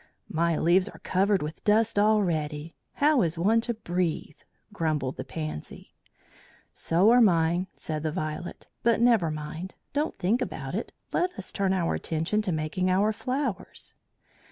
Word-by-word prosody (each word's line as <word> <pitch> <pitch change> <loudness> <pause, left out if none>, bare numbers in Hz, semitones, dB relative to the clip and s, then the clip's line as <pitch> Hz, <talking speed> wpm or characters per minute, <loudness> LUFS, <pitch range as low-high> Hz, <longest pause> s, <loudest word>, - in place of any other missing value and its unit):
"My 170 0 +1
leaves 185 +4 +3
are - - -12
covered 195 -1 +1
with 150 +1 -7
dust 215 0 +3
already. 165 -7 +1 0.2
How 290 -2 +3
is 165 -2 0
one 215 +7 +3
to 235 0 -2
breathe?" 175 -7 -2 0.3
grumbled 155 -7 -1
the - - -4
Pansy. 155 - -7 0.8
"So 180 +7 +3
are 245 +1 +6
mine," 175 -2 +3
said 155 -1 -4
the 155 0 -1
Violet; 155 +3 -5
"but 235 -1 +3
never 230 -8 +4
mind. 155 +4 -6 0.2
Don't 295 +3 -1
think 200 +6 +1
about - - -4
it. - - -3 0.2
Let 360 - +2
us - - -4
turn 195 -2 0
our 180 -3 +1
attention 165 +7 -1
to 205 -4 -2
making 160 +4 -1
our 200 +4 +3
flowers." 255 -5 -4
185 Hz, 155 wpm, -27 LUFS, 160-215 Hz, 0.8 s, are